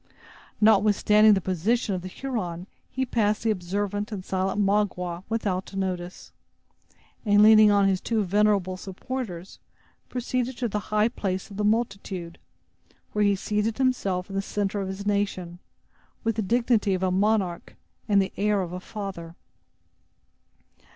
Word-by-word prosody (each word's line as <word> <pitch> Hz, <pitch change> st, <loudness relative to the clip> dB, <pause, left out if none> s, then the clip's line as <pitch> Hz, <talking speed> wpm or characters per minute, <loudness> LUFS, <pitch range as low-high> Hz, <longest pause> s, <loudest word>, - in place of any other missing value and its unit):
Notwithstanding 210 Hz, 0 st, +5 dB
the 190 Hz, -, -1 dB
position 195 Hz, +5 st, 0 dB
of 185 Hz, -, -3 dB
the 185 Hz, -, -7 dB
Huron, 185 Hz, -7 st, -4 dB, 0.2 s
he 260 Hz, 0 st, -2 dB
passed 215 Hz, -4 st, 0 dB
the 225 Hz, -, +2 dB
observant 205 Hz, +2 st, -3 dB
and 190 Hz, -3 st, -6 dB
silent 190 Hz, +1 st, -1 dB
Magua 195 Hz, -4 st, 0 dB
without 200 Hz, -4 st, -2 dB
notice, 185 Hz, -2 st, -4 dB, 0.9 s
and 205 Hz, -2 st, +5 dB
leaning 215 Hz, 0 st, +8 dB
on 200 Hz, -1 st, +4 dB
his 190 Hz, -1 st, +1 dB
two 225 Hz, -2 st, 0 dB
venerable 200 Hz, -1 st, +1 dB
supporters 190 Hz, -2 st, -6 dB, 0.5 s
proceeded 250 Hz, 0 st, -2 dB
to 245 Hz, -, -1 dB
the 210 Hz, -1 st, -2 dB
high 215 Hz, +1 st, +3 dB
place 195 Hz, -4 st, -4 dB
of 200 Hz, -, -9 dB
the 210 Hz, -, -1 dB
multitude, 195 Hz, -6 st, -2 dB, 0.7 s
where 210 Hz, -, +2 dB
he 200 Hz, -1 st, +3 dB
seated 210 Hz, +3 st, -1 dB
himself 200 Hz, -9 st, 0 dB
in 195 Hz, -, -8 dB
the 195 Hz, -, +1 dB
center 200 Hz, 0 st, -2 dB
of 195 Hz, -, -3 dB
his 190 Hz, +1 st, -6 dB
nation, 195 Hz, -4 st, -1 dB, 0.6 s
with 225 Hz, -1 st, 0 dB
the 220 Hz, -, 0 dB
dignity 225 Hz, -2 st, +2 dB
of 185 Hz, -, -3 dB
a 185 Hz, -, +1 dB
monarch 195 Hz, -2 st, 0 dB, 0.3 s
and 200 Hz, -1 st, +5 dB
the 190 Hz, -, -1 dB
air 205 Hz, 0 st, +2 dB
of 175 Hz, -1 st, -7 dB
a 180 Hz, -, -4 dB
father. 185 Hz, -5 st, -7 dB
205 Hz, 150 wpm, -26 LUFS, 185-215 Hz, 0.9 s, leaning